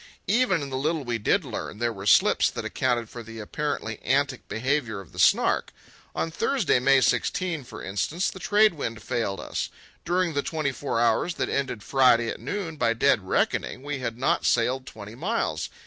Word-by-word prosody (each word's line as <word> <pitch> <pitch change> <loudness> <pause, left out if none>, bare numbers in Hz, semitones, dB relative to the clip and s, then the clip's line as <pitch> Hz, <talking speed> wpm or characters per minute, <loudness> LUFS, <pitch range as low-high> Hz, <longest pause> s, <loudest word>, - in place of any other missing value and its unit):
Even 200 - +2
in 140 - -6
the 130 - -2
little 155 +2 -1
we 120 -2 -2
did 175 - +1
learn 110 -3 -5
there 120 +1 -1
were 100 -1 -7
slips - - +5
that - - -6
accounted 120 -3 0
for 120 - -9
the 115 0 -10
apparently 115 0 -4
antic 135 0 0
behaviour 120 -2 -1
of 95 - -12
the - - -10
Snark. - - +3 0.4
On 165 - -1
Thursday, 225 - +1
May 135 +1 +4
16, 170 +2 0
for - - -9
instance, 145 - -1
the 190 - -10
trade 210 +3 +4
wind 115 -8 -5
failed 105 -5 -2
us. - - -3 0.3
During 175 -1 0
the 140 - +1
twenty 155 -2 -2
four 135 -3 -2
hours 140 +8 +2
that - - -2
ended 130 -6 -2
Friday 125 -4 +4
at - - -5
noon, 175 -6 -4
by 115 -3 +2
dead 115 - +2
reckoning 130 - 0
we 145 -1 -3
had 115 -2 -4
not 130 - +1
sailed 130 +3 +1
twenty 105 0 -9
miles. 195 - -2
130 Hz, 190 wpm, -26 LUFS, 115-160 Hz, 0.4 s, slips